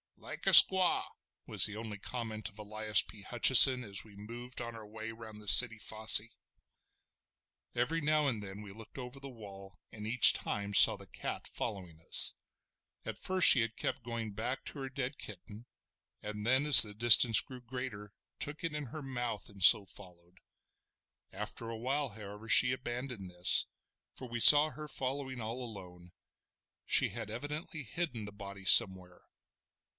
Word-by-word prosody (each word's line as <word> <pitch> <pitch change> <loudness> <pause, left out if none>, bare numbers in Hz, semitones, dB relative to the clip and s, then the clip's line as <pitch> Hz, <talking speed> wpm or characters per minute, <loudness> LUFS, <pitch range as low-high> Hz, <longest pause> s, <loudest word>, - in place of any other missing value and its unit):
"Like - - -12
a - - +2
squaw!" 185 -2 +7 0.4
was - - 0
the 105 - -7
only 110 -2 -10
comment 110 -2 -9
of 105 - -23
Elias 105 -1 -1
P. 105 -2 -15
Hutcheson, 125 +2 +6
as 100 -3 -8
we 105 -2 -20
moved 120 +5 -12
on 115 -1 -9
our 110 -1 -13
way 110 +1 -11
round 110 -1 -14
the 105 - -14
city 115 +2 +2
fosse. 110 -2 +3 1.5
Every 145 +8 -4
now 150 0 -2
and 115 -6 -5
then 100 0 -11
we 100 - -14
looked 110 +5 -17
over 125 +1 -11
the 135 0 -12
wall 100 -5 -16
and 105 -1 -11
each 115 +1 +6
time 100 0 -7
saw - - +8
the - - -16
cat - - -9
following 90 -8 -9
us. - - +1 0.7
At - - -10
first 185 -2 +3
she 125 - +5
had 115 0 -6
kept 130 - -7
going 115 -2 -8
back 110 +6 -7
to 140 - -10
the 135 - -8
dead 130 +1 -8
kitten, 105 +3 -13 0.6
and 105 +1 -9
then 130 +4 -1
as 150 -6 +11
the 105 -2 +2
distance 115 0 +5
grew 130 -1 -15
greater 120 -4 -10 0.3
took 150 +4 -9
it 165 -2 -6
in 150 -1 -8
her 150 +5 -12
mouth 120 -5 -8
and 100 -2 -16
so 105 +2 +5
followed. 90 -1 -17 0.9
After 105 +3 -9
a 115 - -9
while, 135 +4 -5
however, 105 0 -14
she 125 +2 +2
abandoned 125 -5 -9
this, 90 0 +1 0.5
for 130 - -10
we 120 0 -8
saw 150 +5 +6
her 150 +3 -12
following 130 -2 -7
all 115 +3 -8
alone; 90 -6 -14 0.7
she - - 0
had - - -10
evidently 150 +2 -9
hidden 125 -3 -7
the 100 - -12
body 100 -1 -13
somewhere. 95 -4 +2
115 Hz, 170 wpm, -29 LUFS, 105-130 Hz, 1.5 s, as